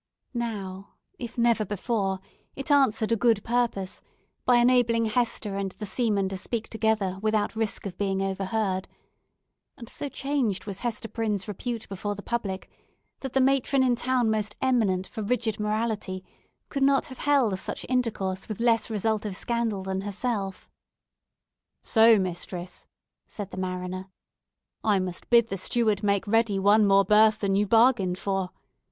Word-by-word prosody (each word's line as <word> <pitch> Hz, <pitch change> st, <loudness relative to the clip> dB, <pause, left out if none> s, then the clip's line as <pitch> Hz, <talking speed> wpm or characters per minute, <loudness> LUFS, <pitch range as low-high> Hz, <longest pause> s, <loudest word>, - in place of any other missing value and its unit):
Now, 200 Hz, -5 st, -5 dB, 0.2 s
if 240 Hz, -1 st, -7 dB
never 235 Hz, -2 st, +3 dB
before, 200 Hz, -1 st, -2 dB, 0.3 s
it 275 Hz, +2 st, -4 dB
answered 230 Hz, -6 st, +3 dB
a -, -, +5 dB
good 225 Hz, -2 st, +2 dB
purpose 230 Hz, -6 st, -1 dB, 0.4 s
by 250 Hz, -, +5 dB
enabling 240 Hz, -1 st, +4 dB
Hester 215 Hz, -3 st, 0 dB
and 195 Hz, -1 st, -3 dB
the 210 Hz, -, -7 dB
seaman 205 Hz, -3 st, 0 dB
to 190 Hz, -, -4 dB
speak 225 Hz, +4 st, -4 dB
together 220 Hz, -4 st, 0 dB
without 215 Hz, 0 st, 0 dB
risk 220 Hz, -2 st, -2 dB
of 185 Hz, -3 st, -6 dB
being 195 Hz, -1 st, 0 dB
overheard; 195 Hz, 0 st, -1 dB, 0.9 s
and 235 Hz, -4 st, -10 dB
so 285 Hz, -, -5 dB
changed 270 Hz, -9 st, -1 dB
was 200 Hz, -2 st, -6 dB
Hester 230 Hz, -2 st, -3 dB
Prynne's 215 Hz, -3 st, -2 dB
repute 225 Hz, +3 st, -4 dB
before 205 Hz, +1 st, -4 dB
the 200 Hz, -, -9 dB
public, 200 Hz, -6 st, -3 dB, 0.5 s
that 265 Hz, -2 st, -6 dB
the 270 Hz, -, +3 dB
matron 270 Hz, 0 st, +3 dB
in 250 Hz, -2 st, +3 dB
town, 245 Hz, -2 st, +1 dB
most 215 Hz, -1 st, -1 dB
eminent 215 Hz, -8 st, +2 dB
for 220 Hz, -, -7 dB
rigid 220 Hz, 0 st, -1 dB
morality, 210 Hz, -3 st, -2 dB, 0.5 s
could 275 Hz, -, -3 dB
not 275 Hz, 0 st, +4 dB
have 260 Hz, -5 st, -9 dB
held 260 Hz, -10 st, +2 dB
such -, -, -5 dB
intercourse 210 Hz, -7 st, -1 dB
with 215 Hz, -, -4 dB
less 230 Hz, -1 st, +2 dB
result 220 Hz, 0 st, 0 dB
of 205 Hz, -3 st, -4 dB
scandal 230 Hz, -2 st, -1 dB
than 190 Hz, 0 st, -2 dB
herself. 200 Hz, -1 st, -3 dB, 1.2 s
"So, 225 Hz, 0 st, +6 dB
mistress," 180 Hz, -1 st, -4 dB, 0.4 s
said 205 Hz, -2 st, -7 dB
the -, -, -8 dB
mariner, 185 Hz, 0 st, -4 dB, 0.7 s
"I 210 Hz, -2 st, +3 dB
must 185 Hz, -2 st, -4 dB
bid 235 Hz, -1 st, +5 dB
the 195 Hz, -, -3 dB
steward 215 Hz, 0 st, +1 dB
make 200 Hz, -2 st, +1 dB
ready 225 Hz, -1 st, +2 dB
one 205 Hz, +2 st, +5 dB
more 195 Hz, 0 st, +5 dB
berth 215 Hz, +2 st, +5 dB
than 195 Hz, -2 st, +1 dB
you 205 Hz, +1 st, +2 dB
bargained 225 Hz, -5 st, +4 dB
for! 195 Hz, -1 st, -1 dB
215 Hz, 155 wpm, -26 LUFS, 195-235 Hz, 1.2 s, So